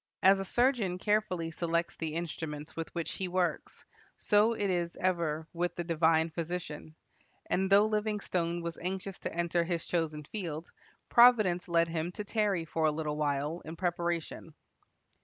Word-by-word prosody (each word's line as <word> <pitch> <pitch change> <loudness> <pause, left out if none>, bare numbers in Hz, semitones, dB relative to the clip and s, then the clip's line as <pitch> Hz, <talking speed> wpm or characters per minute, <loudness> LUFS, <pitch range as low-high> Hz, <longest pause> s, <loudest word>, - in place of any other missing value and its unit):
As 195 +1 +6
a 195 - -3
surgeon 240 -5 +1
carefully 185 -5 0
selects 170 +1 -1
the 160 -1 -4
instruments 155 -2 -5
with 165 -1 -4
which 170 -2 -2
he 190 - -3
works, 180 -1 -2 0.3
so 210 +2 +4
it 205 -3 -1
is 175 -1 -1
ever 165 -4 -1
with 175 +1 -1
the 175 - -3
divine 165 -1 +2
Physician; 160 -2 -5 0.5
and 190 +1 0
though 200 +1 +7
Livingstone 205 -6 -1
was 170 0 -5
anxious 190 +2 -4
to - - -4
enter 170 0 0
his 170 -1 -2
chosen 155 -3 -1
field, 165 -2 -5 0.4
providence 215 -8 +5
led 170 -1 +3
him 165 +1 -2
to 210 - -4
tarry 205 -5 0
for 160 0 -1
a 155 - +4
little 150 -1 -2
while 150 +2 -1
in 160 +1 -7
preparation. 170 -2 -3
170 Hz, 160 wpm, -31 LUFS, 160-190 Hz, 0.5 s, though